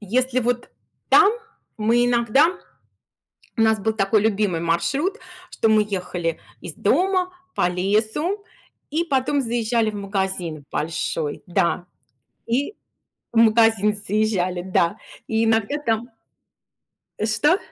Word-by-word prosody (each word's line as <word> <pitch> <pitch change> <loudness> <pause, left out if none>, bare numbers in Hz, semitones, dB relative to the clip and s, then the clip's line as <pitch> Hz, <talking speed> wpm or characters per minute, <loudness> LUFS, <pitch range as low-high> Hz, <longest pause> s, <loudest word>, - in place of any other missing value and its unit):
если 255 +5 0
вот 245 0 -1 0.4
там 405 0 +7 0.5
мы 230 +3 +2
иногда 245 +8 +3 1.0
у - - +2
нас 220 -1 +3
был 220 +2 0
такой 210 0 +2
любимый 205 -5 +1
маршрут, 275 - 0 0.3
что 225 - 0
мы 215 -1 +4
ехали 180 -3 -3 0.2
из - - -4
дома 370 -1 +1 0.2
по - - +2
лесу 220 - 0 0.5
и 320 +3 +1
потом 280 -2 0
заезжали 230 -2 0
в 210 - -9
магазин 190 -6 -3
в - - -39
большой. 155 -1 -3
Да. 175 0 0 0.6
И 270 - -1 0.6
в 235 - -3
магазин 225 -2 +4
заезжали, 200 -4 -1
да. 185 +1 +1 0.3
И 225 0 +1
иногда 225 +4 +1
там 230 +2 0 1.1
Э. 215 - 0
Что? 295 - +3
220 Hz, 120 wpm, -22 LUFS, 195-245 Hz, 1.1 s, там